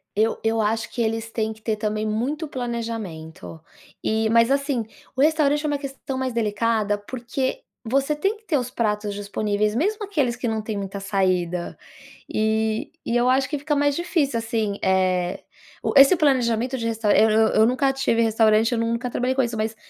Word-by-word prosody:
Eu 220 +2 +1
eu 225 0 +1
acho 220 +2 -1
que 240 - -3
eles 225 0 -2
têm 220 -1 -1
que 220 - -20
ter 220 -1 -1
também 215 0 -2
muito 265 +9 -2
planejamento, 220 - -5 0.4
e 220 0 +1
mas 230 +2 +4
assim, 275 -4 0 0.3
o 260 - 0
restaurante 295 -1 +3
é - - +1
uma 290 -1 0
questão 270 -1 -6
mais 260 -1 -2
delicada, 215 -1 0
porque 260 - -4 0.2
você 275 +5 +1
tem 390 +8 -1
que 435 - -28
ter 315 -8 +1
os 250 -2 -2
pratos 210 -3 -1
disponíveis 205 +1 -1
mesmo 415 - 0
aqueles 285 -12 0
que 245 - -3
não 220 -1 -1
têm 215 -1 -4
muita 200 0 -5
saída. 185 -3 -1 0.5
E 220 +5 0
e 235 - -2
eu 240 +1 +3
acho 260 +1 +2
que 295 - -2
fica 295 +1 -1
mais 285 0 +2
difícil, 325 -7 0
assim, 225 -3 -2
eh, 185 -2 +1 0.4
o - - -1
esse 275 +6 +8
planejamento 255 -4 +1
de 230 - -4
restaurante, 225 -2 +2
eu 220 - +4 0.3
eu - - +7
nunca 255 +3 +2
tive 270 -4 +1
restaurante, 225 0 +3
eu 240 - 0
nunca 230 +2 -1
trabalhei 250 +2 0
com 270 - +3
isso, 235 -3 -2
mas 220 +1 -2
230 Hz, 185 wpm, -23 LUFS, 215-270 Hz, 0.5 s, esse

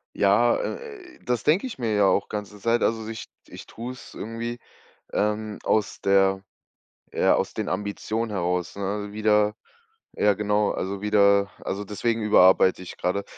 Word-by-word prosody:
Ja, - - +4
äh, 425 -8 -7
das 125 -3 -1
denke 175 - +2
ich 240 - -8
mir 115 -3 -1
ja 105 -1 +3
auch 100 - +2
ganze 105 -1 -6
Zeit. 115 +3 +1
Also 110 -1 0
ich 110 0 -6 0.2
ich - - -11
tu's 125 +2 -9
irgendwie, 115 +2 -5 0.5
ähm, 105 0 -1
aus 105 -2 0
der 95 0 +3 0.7
ja, - - +3
aus - - -2
den - - -3
Ambitionen 110 +2 -3
heraus, 90 -2 -2
ne, 100 +1 -3
wieder 105 0 +2 0.6
ja 105 0 +3
genau, 105 +1 +1
also 95 +1 -4
wieder 100 -1 +3
also, 100 +2 -4
deswegen 115 +3 -1
überarbeite 95 -2 +5
ich 90 - -10
gerade. 100 +3 -1
105 Hz, 150 wpm, -25 LUFS, 100-115 Hz, 0.7 s, überarbeite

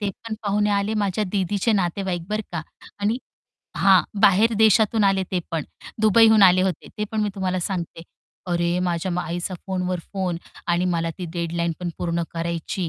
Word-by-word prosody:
ते 205 -1 -1
पण 225 +3 -7
पाहुणे 205 0 +1
आले 200 +2 0
माझ्या 205 0 0
दीदीचे 200 +3 +1
नातेवाईक 185 -2 -1
बरं 215 +1 -1
का. 170 -2 -3 0.4
आणि 210 +4 0 0.6
हां. 190 -2 +5 0.2
बाहेर 205 +4 +5
देशातून 220 0 +4
आले 195 -1 +3
ते 185 - 0
पण 160 -3 -2 0.4
दुबईहून 220 0 +6
आले 185 -1 +6
होते, 190 -2 -2
ते 210 - 0
पण 220 - 0
मी 210 - 0
तुम्हाला 185 -2 -1
सांगते. 170 -2 -4 0.5
अरे! 175 +1 +1
माझ्या 180 0 -1
आईचा 175 +3 -4
फोनवर 185 -1 -2
फोन 185 -3 -1 0.3
आणि 175 +1 +1
मला 165 0 -1
ती 180 - -4
डेडलाईन 170 0 -1
पण 180 - -3
पूर्ण 170 -1 -1
करायची 170 +1 -3
185 Hz, 170 wpm, -23 LUFS, 175-205 Hz, 0.6 s, दुबईहून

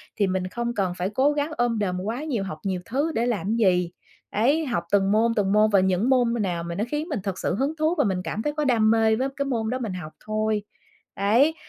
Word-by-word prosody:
thì 200 - +1
mình 185 0 -1
không 235 +4 -3
cần 190 -4 -1
phải 180 +2 -1
cố 265 +7 +2
gắng 295 +1 -1
ôm 240 -2 +1
đồm 180 -3 -1
quá 230 +9 -3
nhiều, 245 -11 -2
học 155 -5 -6
nhiều 185 -2 -2
thứ 285 +7 -1
để 230 - +1
làm 225 -2 -1
gì, 180 -6 +2 0.4
đấy. 280 +10 +2
Học 215 -11 -1
từng 195 -1 +3
môn 230 +2 +3
từng 195 -2 +1
môn 215 +1 +5
và 200 - +4
những 190 +6 +1
môn 245 -3 +3
nào 175 -4 -2
mà 170 0 -5
nó 205 - -1
khiến 300 +4 -3
mình 280 - -2
thực 195 -2 -3
sự 180 - -1
hứng 275 +6 0
thú 315 +3 +2
và 290 - +4
mình 190 -4 0
cảm 215 - -3
thấy 295 +5 -2
có 300 0 -1
đam 225 -4 +3
mê 225 -1 +3
với 260 +4 0
cái 280 - -1
môn 225 -5 -1
đó 255 - -2
mình 220 -7 -3
học 155 -4 -7
thôi. 215 -1 -1 0.5
Đấy, 240 +11 +3
220 Hz, 255 wpm, -24 LUFS, 195-255 Hz, 0.5 s, môn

